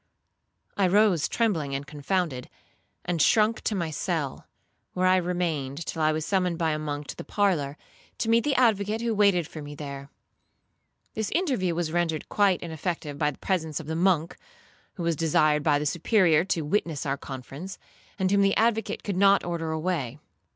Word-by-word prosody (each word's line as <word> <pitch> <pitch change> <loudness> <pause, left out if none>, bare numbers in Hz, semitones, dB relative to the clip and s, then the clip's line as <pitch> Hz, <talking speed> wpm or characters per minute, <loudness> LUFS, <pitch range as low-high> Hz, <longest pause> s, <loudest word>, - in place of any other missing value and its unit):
I 195 -2 +3
rose 195 -4 +3
trembling 165 -12 0
and 140 +1 -4
confounded, 150 -2 -2 0.6
and 175 -3 0
shrunk 220 +7 +3
to 215 - 0
my 170 -4 -2
cell, 155 -3 -3 0.5
where 185 0 0
I 185 0 +5
remained 170 -5 -2
till 160 - -4
I 155 0 +4
was 155 0 -2
summoned 180 -3 0
by 165 -2 +1
a 155 - -1
monk 145 -1 -4
to - - -5
the - - -7
parlour, 160 -9 0 0.4
to 230 - -2
meet 230 0 +4
the 290 -2 +1
advocate, 220 -3 +2
who 235 -1 0
waited 200 -6 +3
for 155 - -9
me 145 0 -8
there. 140 -1 -7 1.0
This 220 -1 -2
interview 250 - 0
was 165 -2 -1
rendered 165 -2 -1
quite 200 -3 +2
ineffective 160 -3 -4
by 150 -2 +2
the 145 - -8
presence 160 -6 -1
of 160 - -8
the 160 +1 -3
monk, 170 -1 +1 0.6
who 175 - -5
was 170 -1 +1
desired 155 -1 +2
by 145 -1 +3
the 150 - -2
Superior 170 0 +3
to 170 -3 0
witness 155 -2 -1
our 135 -1 0
conference, 140 +7 -8 0.4
and 190 -2 0
whom 200 0 +4
the 195 0 +3
advocate 225 -1 +1
could 200 -3 -3
not 200 +1 +5
order 170 -2 -3
away. 160 -6 -2
170 Hz, 180 wpm, -26 LUFS, 150-195 Hz, 1.0 s, I